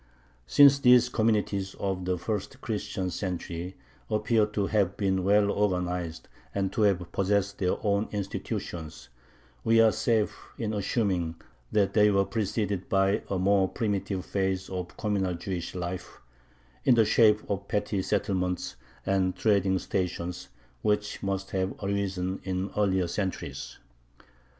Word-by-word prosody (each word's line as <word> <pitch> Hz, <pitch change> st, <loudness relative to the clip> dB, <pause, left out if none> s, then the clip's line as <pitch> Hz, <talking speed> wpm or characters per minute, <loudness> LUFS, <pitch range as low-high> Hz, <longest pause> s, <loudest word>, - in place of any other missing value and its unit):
Since 140 Hz, -, +7 dB
these 125 Hz, -2 st, +6 dB
communities 105 Hz, -4 st, 0 dB
of 95 Hz, -2 st, -3 dB
the 90 Hz, 0 st, 0 dB
first 105 Hz, +7 st, -4 dB
Christian 105 Hz, -6 st, -3 dB
century 90 Hz, 0 st, -4 dB, 0.3 s
appear 110 Hz, 0 st, +2 dB
to 105 Hz, -1 st, -1 dB
have 100 Hz, -3 st, +1 dB
been 95 Hz, -2 st, +1 dB
well 100 Hz, +1 st, +4 dB
organized 90 Hz, -5 st, -1 dB, 0.3 s
and 95 Hz, -1 st, -1 dB
to 115 Hz, -, -1 dB
have 90 Hz, -4 st, +2 dB
possessed 100 Hz, 0 st, 0 dB
their 90 Hz, -1 st, +1 dB
own 100 Hz, +1 st, +1 dB
institutions, 85 Hz, -7 st, -5 dB, 0.5 s
we 115 Hz, 0 st, +4 dB
are 115 Hz, -1 st, +6 dB
safe 110 Hz, -2 st, +1 dB, 0.2 s
in 110 Hz, -2 st, -2 dB
assuming 95 Hz, -5 st, 0 dB, 0.4 s
that 100 Hz, -2 st, +2 dB
they 105 Hz, -1 st, +5 dB
were 100 Hz, -1 st, +3 dB
preceded 100 Hz, -1 st, -2 dB
by 95 Hz, +1 st, +2 dB
a 95 Hz, -, 0 dB
more 95 Hz, 0 st, +3 dB
primitive 100 Hz, -3 st, -2 dB
phase 95 Hz, -1 st, -1 dB
of 90 Hz, -1 st, -5 dB
communal 100 Hz, -4 st, 0 dB
Jewish 85 Hz, 0 st, -5 dB
life, 90 Hz, 0 st, -5 dB, 0.6 s
in 125 Hz, -, +5 dB
the 115 Hz, -2 st, +5 dB
shape 105 Hz, 0 st, +4 dB
of 100 Hz, 0 st, -3 dB
petty 105 Hz, -1 st, -1 dB
settlements 95 Hz, -2 st, -1 dB, 0.3 s
and 95 Hz, -2 st, +1 dB
trading 100 Hz, -2 st, +2 dB
stations, 90 Hz, -1 st, -3 dB, 0.3 s
which 105 Hz, 0 st, 0 dB
must 95 Hz, -1 st, -3 dB
have 95 Hz, 0 st, -1 dB
arisen 95 Hz, -2 st, -2 dB
in 95 Hz, +1 st, -2 dB
earlier 95 Hz, -3 st, +2 dB
centuries. 95 Hz, +2 st, -4 dB
100 Hz, 135 wpm, -28 LUFS, 95-105 Hz, 0.6 s, Since